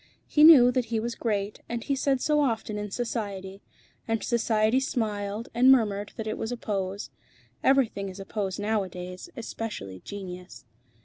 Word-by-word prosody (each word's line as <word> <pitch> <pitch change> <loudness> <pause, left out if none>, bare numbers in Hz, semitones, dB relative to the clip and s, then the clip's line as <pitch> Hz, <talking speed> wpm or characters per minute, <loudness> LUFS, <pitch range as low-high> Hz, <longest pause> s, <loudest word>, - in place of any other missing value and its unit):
He 300 - +3
knew 275 -6 +9
that 250 -1 0
he 225 -1 -1
was 235 +2 -3
great, 205 -3 -2
and 235 -1 -3
he 280 - 0
said 270 -1 +1
so 300 -1 +2
often 225 -5 -1
in 210 0 -4
Society. 200 -4 -4 0.5
And 225 -1 -1
Society 225 0 +2
smiled 215 -4 -2
and 250 +3 +6
murmured 205 -5 +2
that 220 - -5
it 215 - -3
was 225 - -3
a 245 - -3
pose. 200 -2 -3 0.5
Everything 235 -7 +2
is 190 +1 -10
a 195 - -7
pose 195 -2 -3
nowadays, 190 - -3
especially 210 - -6
genius. 180 - -9
220 Hz, 165 wpm, -27 LUFS, 200-240 Hz, 0.5 s, knew